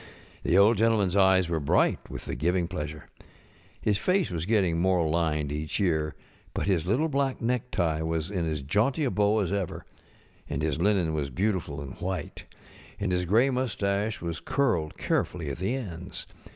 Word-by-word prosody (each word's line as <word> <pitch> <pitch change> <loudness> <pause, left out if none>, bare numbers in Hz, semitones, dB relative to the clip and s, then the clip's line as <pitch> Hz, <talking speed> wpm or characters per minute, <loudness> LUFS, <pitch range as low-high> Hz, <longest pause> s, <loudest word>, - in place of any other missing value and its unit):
The 90 - +2
Old 105 +3 +6
GentlemanŌĆÖs 105 -4 +2
eyes 95 -2 +5
were 85 -1 0
bright 70 - +2
with - - -7
the - - -4
giving 85 +6 +1
pleasure. 75 -4 -6 0.7
His 105 -2 +1
face 185 - +1
was 85 0 -3
getting 95 -7 +2
more 90 -3 +3
lined 75 -3 0
each 75 +4 -3
year, 80 -6 +1 0.4
but - - -1
his 90 -4 +1
little 130 - +2
black 140 -3 0
necktie 115 -10 0
was 80 +2 -2
in 90 -5 -1
as 75 -3 -3
jaunty 110 - +1
a 130 - +1
bow 105 +1 +2
as 95 -1 -1
ever, 100 -4 -3 0.6
and 70 - -2
his 80 0 0
linen 95 -5 +2
was 75 -3 -1
beautiful 90 -2 -1
and 70 -2 -8
white, 90 -3 -4 0.5
and 100 -2 -1
his 90 0 +1
gray 115 +9 +4
mustache 105 -5 -1
was 85 -1 -3
curled 100 - 0
carefully 80 -5 -1
at 70 - -6
the 95 +8 0
ends. 90 -9 -6
90 Hz, 175 wpm, -27 LUFS, 80-105 Hz, 0.7 s, Old